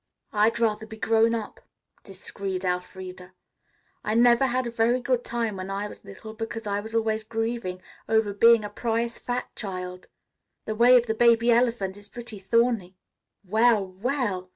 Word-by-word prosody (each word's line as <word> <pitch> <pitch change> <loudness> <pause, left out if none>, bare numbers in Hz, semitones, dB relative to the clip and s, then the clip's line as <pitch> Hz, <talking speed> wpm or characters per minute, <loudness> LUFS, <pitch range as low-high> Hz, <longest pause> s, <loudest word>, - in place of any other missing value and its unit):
"I'd 215 +2 +2
rather 220 -1 0
be 220 - -10
grown 225 +1 +3
up," 220 -2 -6 0.4
disagreed 195 -1 -6
Elfreda. 180 0 -5 0.7
"I 215 - -1
never 240 +2 +5
had 255 0 -1
a 235 - -4
very 235 +2 +2
good 250 -1 0
time 230 -4 -2
when 185 +1 -6
I 200 +1 -3
was - - -12
little, 200 +2 -10
because 225 0 -6
I 200 0 -1
was 220 +2 -7
always 220 -1 0
grieving 225 -4 -3 0.3
over 220 -2 +2
being 230 +2 +5
a 210 - -5
prize 230 0 -2
fat 245 0 -4
child. 185 -3 -6 0.6
The 215 - -2
way 240 +3 +6
of 240 - +2
the 220 - -1
baby 235 +1 +4
elephant 230 -5 +1
is 205 0 -12
pretty 235 -4 -8
thorny. 220 -2 +1 0.5
Well, 220 +1 +3
well!" 190 -1 -3
220 Hz, 165 wpm, -26 LUFS, 195-235 Hz, 0.7 s, way